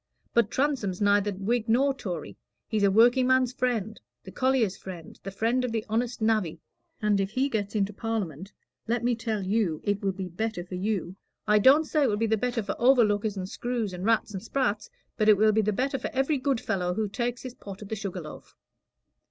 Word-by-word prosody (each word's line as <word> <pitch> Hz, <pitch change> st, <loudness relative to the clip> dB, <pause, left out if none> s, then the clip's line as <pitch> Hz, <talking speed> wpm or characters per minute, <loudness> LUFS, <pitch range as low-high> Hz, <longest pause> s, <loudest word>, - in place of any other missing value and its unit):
But 235 Hz, -3 st, +3 dB
Transome's 260 Hz, -10 st, -1 dB
neither 205 Hz, 0 st, +3 dB
Whig 215 Hz, +4 st, -1 dB
nor 270 Hz, +5 st, +3 dB
Tory; 180 Hz, -, -6 dB, 0.3 s
he's 215 Hz, -2 st, -1 dB
the 200 Hz, -, +5 dB
workingman's 250 Hz, +4 st, +4 dB
friend, 230 Hz, -5 st, -2 dB, 0.2 s
the 190 Hz, -, -10 dB
collier's 255 Hz, -6 st, +1 dB
friend, 175 Hz, -4 st, -10 dB
the 195 Hz, -, -6 dB
friend 230 Hz, +6 st, 0 dB
of 250 Hz, -, -2 dB
the 225 Hz, -1 st, -2 dB
honest 230 Hz, +1 st, -1 dB
navvy. 215 Hz, -8 st, +1 dB, 0.4 s
And 210 Hz, -1 st, +3 dB
if 195 Hz, 0 st, 0 dB
he 260 Hz, +6 st, 0 dB
gets 210 Hz, -3 st, -2 dB
into 205 Hz, 0 st, 0 dB
Parliament, 195 Hz, -, -4 dB, 0.4 s
let 235 Hz, +1 st, 0 dB
me 245 Hz, 0 st, +2 dB
tell 225 Hz, -3 st, -2 dB
you 190 Hz, -5 st, 0 dB
it 205 Hz, 0 st, 0 dB
will 195 Hz, -1 st, +1 dB
be 190 Hz, 0 st, -5 dB
better 180 Hz, +1 st, -3 dB
for 180 Hz, -, -11 dB
you. 190 Hz, -1 st, -2 dB, 0.3 s
I 210 Hz, 0 st, +5 dB
don't 280 Hz, +8 st, +6 dB
say 305 Hz, 0 st, 0 dB
it -, -, +2 dB
will 205 Hz, -, 0 dB
be 225 Hz, -, +1 dB
the 220 Hz, 0 st, +2 dB
better 240 Hz, +1 st, -1 dB
for 200 Hz, -, -3 dB
overlookers 220 Hz, -5 st, +3 dB
and 185 Hz, -1 st, -3 dB
screws, 230 Hz, -1 st, -3 dB
and 180 Hz, 0 st, -6 dB
rats 225 Hz, 0 st, +1 dB
and 190 Hz, -, -4 dB
sprats; 260 Hz, -, -1 dB, 0.3 s
but 215 Hz, -1 st, +3 dB
it 210 Hz, -, +7 dB
will 215 Hz, +1 st, +5 dB
be 220 Hz, +1 st, +3 dB
the 215 Hz, 0 st, +1 dB
better 270 Hz, +6 st, -1 dB
for -, -, -3 dB
every 270 Hz, +2 st, +1 dB
good 265 Hz, -2 st, 0 dB
fellow 180 Hz, -5 st, -1 dB
who 215 Hz, -1 st, 0 dB
takes 240 Hz, +4 st, -3 dB
his 255 Hz, -2 st, -6 dB
pot 200 Hz, -3 st, -10 dB
at 200 Hz, -, -11 dB
the 220 Hz, -, -2 dB
Sugar 195 Hz, -3 st, -5 dB
Loaf." 155 Hz, -1 st, -11 dB
215 Hz, 215 wpm, -27 LUFS, 195-245 Hz, 0.4 s, it